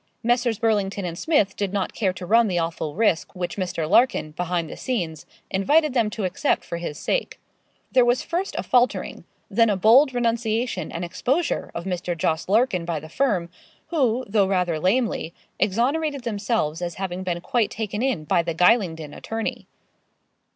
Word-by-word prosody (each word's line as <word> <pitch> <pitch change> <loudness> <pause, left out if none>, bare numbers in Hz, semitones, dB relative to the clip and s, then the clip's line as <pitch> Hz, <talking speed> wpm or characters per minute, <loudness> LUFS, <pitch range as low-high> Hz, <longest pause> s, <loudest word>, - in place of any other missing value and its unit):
Messrs. 240 -1 +1
Burlington 205 -4 0
and 170 -2 -4
Smith 210 - +1
did 200 -2 -2
not 195 -2 -2
care 195 -4 0
to 180 0 -8
run 230 +4 +4
the 180 -3 -1
awful 165 -3 -2
risk 200 -4 +1
which 180 -1 -3
Mr. 175 -5 -2
Larkin, 205 -5 +3
behind 175 +1 -2
the - - -8
scenes, 170 - -3 0.2
invited 295 +10 +3
them 230 -4 +2
to 215 0 -5
accept 180 0 0
for 170 - -4
his 170 -3 -5
sake. - - -2 0.5
There 255 -2 +5
was 240 +1 +2
first 360 +3 -3
a - - -1
faltering; 245 0 +1 0.2
then 230 +2 +3
a 205 - +1
bold 245 +9 +6
renunciation 230 -3 -1
and 170 +1 -4
exposure 265 - -1
of 170 - -4
Mr. 180 -2 -3
Jos. 160 +2 -1
Larkin 215 -4 +2
by 165 -2 -2
the 155 +2 -11
firm, 185 - 0 0.4
who, 255 -6 +1
though 200 -1 +2
rather 180 -4 0
lamely, 190 -2 0 0.2
exonerated 265 +8 0
themselves 205 -8 -1
as 175 -1 -3
having 185 -1 -4
been 175 -2 -2
quite 225 +4 0
taken 210 -1 -4
in 255 -11 0
by 175 +2 +2
the 170 -1 -3
Gylingden 165 -5 +2
attorney. 225 0 -4
200 Hz, 170 wpm, -24 LUFS, 175-240 Hz, 0.5 s, bold